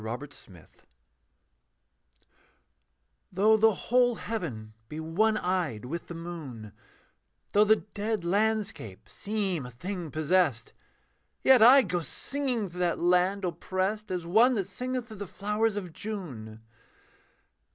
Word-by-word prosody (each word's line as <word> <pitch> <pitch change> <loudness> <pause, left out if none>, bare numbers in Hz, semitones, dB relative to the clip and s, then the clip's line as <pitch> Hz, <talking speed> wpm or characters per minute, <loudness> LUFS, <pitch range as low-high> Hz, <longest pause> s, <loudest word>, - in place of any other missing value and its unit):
THE 110 - -5
END 120 +5 -4
OF 145 0 -11
FEAR 85 -5 -16 2.6
Though 205 +4 +4
the 220 0 +4
whole 245 +2 +2
heaven 145 - -5 0.2
be 155 - -6
one 205 +8 +1
eyed 175 - -2
with 165 +6 -5
the 170 - -7
moon, 150 -11 -8 0.8
Though 210 +1 +5
the 215 +1 +6
dead 210 -2 -3
landscape 205 - -1
seem 200 -7 -2
a 125 - -8
thing 175 +7 -6
possessed, 155 -6 +1 0.7
Yet 260 -3 +6
I 260 +4 +9
go 180 -2 -1
singing 245 - -2
through 175 +1 -10
that 175 -2 +1
land 180 +3 +2
oppressed 185 +5 -2
As 180 -2 -3
one 225 +9 +4
that 195 -4 -1
singeth 250 +5 -4
through 215 - -9
the 205 0 -6
flowers 210 +3 -1
of 180 -5 -5
June. 130 - -7
185 Hz, 130 wpm, -28 LUFS, 160-215 Hz, 2.6 s, I